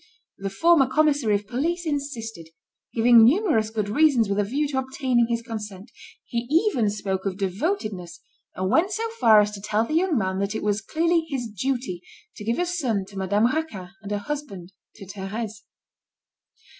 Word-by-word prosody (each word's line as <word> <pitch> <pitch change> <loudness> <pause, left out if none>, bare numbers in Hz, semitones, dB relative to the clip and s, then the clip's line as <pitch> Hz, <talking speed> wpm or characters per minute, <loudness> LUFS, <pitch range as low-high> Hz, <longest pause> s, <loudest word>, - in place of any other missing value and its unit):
The 195 0 -3
former 315 - +4
commissary 280 -5 +2
of 205 +1 -2
police 325 - -2
insisted, 235 - -4 0.4
giving 235 0 +6
numerous 255 - +3
good 215 -2 -2
reasons 255 -1 +3
with 200 +1 0
a - - +3
view 275 +9 -1
to 265 -2 0
obtaining 260 -2 +1
his 235 0 -1
consent. 210 -3 -7 0.3
He 235 -1 -3
even 310 - +2
spoke 195 -2 -3
of 190 -1 -3
devotedness, 200 - -3 0.4
and 185 +1 -1
went 325 +9 +3
so 445 +3 -2
far 215 - +7
as 210 0 0
to 205 -1 -8
tell 215 +2 0
the 305 - -5
young 335 -2 +2
man 190 -3 -1
that 200 +2 -2
it - - -3
was 210 0 0
clearly 330 - +1
his 265 -5 -2
duty 220 -4 -3 0.3
to - - -9
give 230 +2 -1
a 355 - +1
son 260 - -1
to 200 - -14
Madame 205 +3 +2
Raquin 240 - -2
and 205 -1 -8
a 205 - 0
husband 205 -7 -6 0.2
to 200 - -11
Thérèse. 205 +3 -6
225 Hz, 180 wpm, -24 LUFS, 205-290 Hz, 0.4 s, far